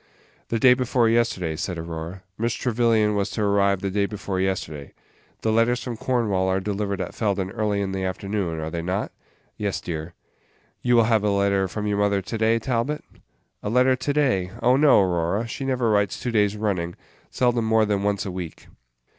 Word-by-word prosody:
"The 115 Hz, -, -1 dB
day 125 Hz, +2 st, +6 dB
before 125 Hz, -2 st, +1 dB
yesterday," 110 Hz, -9 st, +1 dB
said 90 Hz, +2 st, -3 dB
Aurora; 85 Hz, +2 st, -6 dB
"Miss 115 Hz, +3 st, -1 dB
Trevyllian 115 Hz, -3 st, +2 dB
was 100 Hz, -1 st, 0 dB
to 110 Hz, -, -2 dB
arrive 100 Hz, -1 st, +2 dB
the 100 Hz, -, -2 dB
day 100 Hz, +1 st, +1 dB
before 100 Hz, -2 st, -4 dB
yesterday. 80 Hz, -7 st, -3 dB, 0.5 s
The 110 Hz, -, +1 dB
letters 115 Hz, +2 st, +2 dB
from 120 Hz, -2 st, -4 dB
Cornwall 110 Hz, -6 st, 0 dB
are 95 Hz, 0 st, +1 dB
delivered 100 Hz, 0 st, -2 dB
at -, -, -4 dB
Felden 100 Hz, -3 st, -1 dB
early 105 Hz, -2 st, -1 dB
in 95 Hz, -1 st, -2 dB
the 95 Hz, 0 st, -3 dB
afternoon, 95 Hz, -2 st, -2 dB
are 80 Hz, 0 st, -4 dB
they 85 Hz, -, -3 dB
not?" 90 Hz, +4 st, -2 dB, 0.5 s
"Yes, 100 Hz, -2 st, -2 dB
dear." 80 Hz, 0 st, -6 dB, 0.7 s
"You 120 Hz, -1 st, +3 dB
will 115 Hz, -, +6 dB
have 110 Hz, -2 st, +2 dB
a 105 Hz, -, +2 dB
letter 100 Hz, -1 st, +2 dB
from 105 Hz, +3 st, -4 dB
your 105 Hz, -1 st, 0 dB
mother 100 Hz, -1 st, +2 dB
to 115 Hz, -, -4 dB
day, 110 Hz, +1 st, +3 dB
Talbot?" 125 Hz, +5 st, -1 dB, 0.6 s
"A -, -, -3 dB
letter 125 Hz, +3 st, +4 dB
to 130 Hz, +3 st, -2 dB
day! 130 Hz, -11 st, +1 dB
oh, 125 Hz, +2 st, +5 dB
no, 140 Hz, -5 st, +6 dB
Aurora, 90 Hz, +4 st, 0 dB
she 135 Hz, +3 st, -5 dB
never 125 Hz, -4 st, +1 dB
writes 105 Hz, -1 st, +1 dB
two 125 Hz, -, -3 dB
days 105 Hz, -2 st, +2 dB
running; 90 Hz, -5 st, -1 dB, 0.3 s
seldom 120 Hz, -2 st, +1 dB
more 110 Hz, 0 st, +3 dB
than 105 Hz, -1 st, 0 dB
once 100 Hz, 0 st, 0 dB
a 95 Hz, -, -3 dB
week." 90 Hz, -3 st, -7 dB
105 Hz, 195 wpm, -24 LUFS, 95-115 Hz, 0.7 s, day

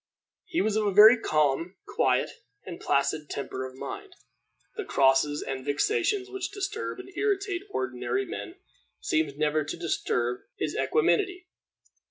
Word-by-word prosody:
He 350 Hz, -1 st, 0 dB
was 215 Hz, -1 st, +1 dB
of 215 Hz, -1 st, +1 dB
a -, -, +2 dB
very 215 Hz, +5 st, +9 dB
calm, 155 Hz, +1 st, +1 dB
quiet, -, -, +1 dB, 0.3 s
and -, -, -7 dB
placid 150 Hz, +2 st, 0 dB
temper 130 Hz, -2 st, -4 dB
of 130 Hz, -, -13 dB
mind. 395 Hz, -, -7 dB, 0.6 s
The 435 Hz, -, -3 dB
crosses 140 Hz, -, +3 dB
and 135 Hz, -1 st, -4 dB
vexations 385 Hz, -, 0 dB
which 390 Hz, -1 st, -4 dB
disturb 405 Hz, +1 st, -4 dB
and 375 Hz, -1 st, -11 dB
irritate 395 Hz, -3 st, 0 dB
ordinary 130 Hz, -, -2 dB
men 100 Hz, -4 st, -7 dB, 0.4 s
seemed 150 Hz, -3 st, 0 dB
never 155 Hz, 0 st, +1 dB
to 145 Hz, -, -5 dB
disturb 125 Hz, -7 st, -1 dB, 0.2 s
his -, -, -2 dB
equanimity. 380 Hz, -5 st, +1 dB
165 Hz, 140 wpm, -27 LUFS, -, 0.6 s, very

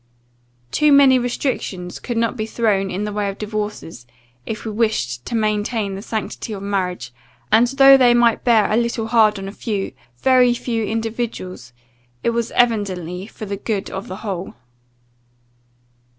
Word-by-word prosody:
Too 300 Hz, -1 st, +3 dB
many 275 Hz, -2 st, +6 dB
restrictions 240 Hz, -7 st, -3 dB
could 240 Hz, -2 st, -4 dB
not 230 Hz, +1 st, 0 dB
be 215 Hz, -2 st, -3 dB
thrown 210 Hz, -4 st, 0 dB
in 190 Hz, +2 st, -3 dB
the 210 Hz, 0 st, -3 dB
way 205 Hz, -1 st, -1 dB
of 195 Hz, -, -6 dB
divorces, 210 Hz, -, -5 dB, 0.4 s
if 220 Hz, -, -5 dB
we 220 Hz, -, -3 dB
wished 205 Hz, -, -1 dB
to 235 Hz, -, -3 dB
maintain 215 Hz, -1 st, 0 dB
the 195 Hz, -, -6 dB
sanctity 220 Hz, 0 st, -4 dB
of 195 Hz, -1 st, -6 dB
marriage; 180 Hz, -11 st, -3 dB, 0.4 s
and, 225 Hz, +3 st, +5 dB
though 270 Hz, +1 st, +7 dB
they 245 Hz, -2 st, +5 dB
might 235 Hz, -1 st, +3 dB
bear 225 Hz, -4 st, +3 dB
a 215 Hz, -, +3 dB
little 235 Hz, -1 st, -1 dB
hard 220 Hz, -2 st, +3 dB
on 195 Hz, 0 st, -6 dB
a -, -, -5 dB
few, 205 Hz, -2 st, -3 dB, 0.3 s
very 250 Hz, -, +4 dB
few 230 Hz, -2 st, -2 dB
individuals, 220 Hz, -, -4 dB, 0.5 s
it 235 Hz, -, +2 dB
was 235 Hz, -1 st, -1 dB
evidently 190 Hz, -6 st, 0 dB
for 220 Hz, -, -9 dB
the 200 Hz, 0 st, -4 dB
good 205 Hz, -1 st, -3 dB
of 190 Hz, +1 st, -6 dB
the 185 Hz, -, -6 dB
whole." 190 Hz, -2 st, -4 dB
215 Hz, 165 wpm, -20 LUFS, 195-235 Hz, 0.5 s, though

